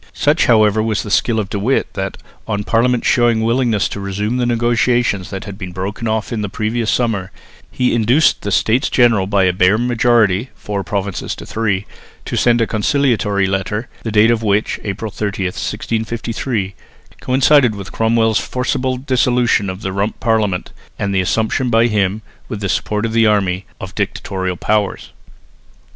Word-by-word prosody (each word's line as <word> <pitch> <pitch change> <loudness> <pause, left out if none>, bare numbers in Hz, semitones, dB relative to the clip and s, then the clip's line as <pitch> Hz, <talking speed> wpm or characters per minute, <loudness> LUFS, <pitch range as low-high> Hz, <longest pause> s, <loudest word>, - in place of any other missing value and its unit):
Such 150 +3 +2
however 110 -2 +4
was 110 -1 -1
the 105 - -7
skill 115 +1 +2
of 105 -2 -4
De 100 - -2
Witt 125 +7 0
that, 95 0 -4 0.3
on 105 -2 -2
Parliament 120 +3 +1
showing 120 -2 +3
a - - 0
willingness 115 -3 +1
to - - -6
resume 105 +4 -2
the 125 -1 0
negotiations 120 -4 +1
that 95 - -5
had 100 -1 -9
been 90 -3 -6
broken 100 +5 -4
off 110 +2 -2
in 110 - -2
the 105 - -3
previous 110 +2 -2
summer, 110 -7 0 0.4
he 125 - 0
induced 120 +7 +3
the 100 - -3
States 115 +6 +2
General 115 -6 +3
by 100 -1 +2
a 90 -1 +3
bare 90 +3 +3
majority 120 -2 +2
(four 100 -1 -4
provinces 100 -2 -3
to - - -10
three) 105 -3 -1 0.4
to - - -4
send 120 -1 +3
a - - +3
conciliatory 110 -3 +1
letter, 95 +4 -2
the 115 - -4
date 110 +2 +5
of 115 -1 +1
which 105 -1 0
(April 105 +1 -4
30, 100 -2 -3
1653) 110 +2 -3 0.5
coincided 130 -2 +3
with 100 -2 -8
Cromwell's 110 -1 +2
forcible 130 0 -2
dissolution 125 -5 +1
of 95 +2 -6
the 95 - -3
Rump 100 +3 -2
Parliament 110 -5 0 0.3
and 100 -1 -2
the 95 - +2
assumption 110 +6 0
by 115 0 +4
him, 105 -2 0 0.3
with 110 -5 -4
the 100 -1 -3
support 105 +4 -1
of 115 - -3
the 115 -1 +4
army, 95 -3 0
of - - -7
dictatorial 95 -2 -3
powers. 105 0 -1
110 Hz, 175 wpm, -17 LUFS, 100-120 Hz, 0.5 s, date